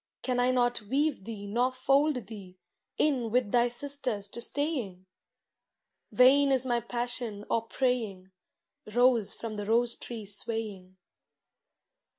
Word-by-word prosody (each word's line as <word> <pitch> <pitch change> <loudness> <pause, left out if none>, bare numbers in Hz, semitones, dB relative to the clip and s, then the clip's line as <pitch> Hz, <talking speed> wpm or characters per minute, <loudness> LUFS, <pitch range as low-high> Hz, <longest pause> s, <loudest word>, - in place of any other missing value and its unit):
Can 250 -1 0
I 245 +1 +3
not 245 -2 +1
weave 270 +1 -1
thee 210 -3 -7
nor 240 +5 +1
fold 270 -1 +1
thee 195 -3 -11 0.4
In 260 -6 +1
with 235 -2 +1
thy 240 0 +4
sisters 250 -5 -2
to 235 - -5
staying? 240 - -1 1.1
Vain 275 +2 +5
is 260 -1 +1
my 240 -2 +1
passion 235 -3 -2
or 230 0 0
praying, 220 -8 -2 0.6
Rose 240 -2 +3
from 220 -2 -6
the 205 - -4
rose 235 +1 +2
tree 230 -3 -7
swaying. 205 -3 -4
240 Hz, 130 wpm, -29 LUFS, 210-255 Hz, 1.1 s, Vain